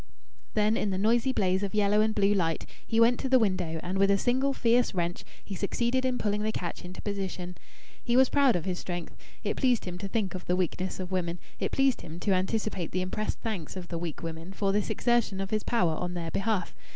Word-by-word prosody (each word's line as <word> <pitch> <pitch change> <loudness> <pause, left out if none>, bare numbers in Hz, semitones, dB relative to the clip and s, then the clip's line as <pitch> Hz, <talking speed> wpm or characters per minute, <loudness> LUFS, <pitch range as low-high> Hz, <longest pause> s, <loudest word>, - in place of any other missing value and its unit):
Then 215 +1 +3
in 210 - 0
the 190 - -1
noisy 230 +6 +3
blaze 190 -5 +1
of 200 +1 -3
yellow 210 0 +4
and 215 0 +1
blue 200 0 +4
light 165 -5 0 0.2
he 225 - +1
went 235 +1 +5
to 265 - -2
the 260 - +6
window 185 -7 0
and 185 +2 -2
with 195 0 +5
a 200 - +5
single 260 +6 +2
fierce 240 -4 +2
wrench 175 0 -1 0.2
he 200 - -6
succeeded 240 +7 0
in 255 -1 +1
pulling 210 -2 0
the 215 +1 0
catch 175 -5 -4
into 180 +1 -8
position. 190 -3 -4 0.5
He 240 0 +2
was 260 0 +7
proud 275 -3 +4
of 175 - -2
his 180 -2 -2
strength. 175 -2 -5 0.3
It - - -1
pleased 250 -4 +2
him 180 -1 -5
to 200 - -4
think 195 -2 -1
of 185 -1 -6
the 180 - +1
weakness 185 +1 -2
of 185 0 -5
women; 175 -2 -1 0.2
it - - -1
pleased 270 -2 +2
him 165 0 -8
to 205 - +1
anticipate 190 -1 -1
the 185 - +1
impressed 210 +3 -3
thanks 200 -9 -4
of 180 -2 -7
the 170 - -3
weak 170 -2 -5
women 165 +3 -6
for 195 0 0
this 205 0 0
exertion 240 -5 +1
of 195 0 -3
his 215 -1 +1
power 180 -10 +1
on 180 +3 -3
their 165 -2 -3
behalf. 195 -2 0
195 Hz, 235 wpm, -29 LUFS, 180-225 Hz, 0.5 s, was